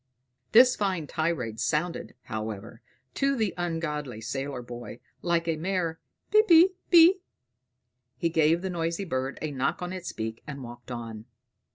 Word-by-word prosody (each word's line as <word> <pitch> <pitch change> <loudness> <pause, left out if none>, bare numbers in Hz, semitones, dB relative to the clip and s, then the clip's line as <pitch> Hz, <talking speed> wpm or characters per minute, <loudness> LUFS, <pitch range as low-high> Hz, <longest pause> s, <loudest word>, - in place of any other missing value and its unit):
This 250 +3 +7
fine 190 -6 -1
tirade 145 -9 -2
sounded, 155 +6 -1
however, 110 +1 -6 0.3
to 275 0 +1
the 220 -6 0
ungodly 150 -8 -3
sailor 135 +3 -4
boy 120 0 -8 0.2
like 170 -1 0
a 165 -1 0
mere 170 -1 -1 0.3
"Pippi 380 -5 +7 0.2
pi." 350 +2 +8 1.0
He 170 - 0
gave 165 +2 +3
the 190 - -2
noisy 170 +2 -2
bird 130 -4 -2
a 155 - -2
knock 135 -1 -1
on 180 - -4
his 185 -1 -5
beak, 110 0 -5
and 140 -3 -6
walked 120 0 -11
on. 115 -3 -6
160 Hz, 145 wpm, -27 LUFS, 125-180 Hz, 1.0 s, pi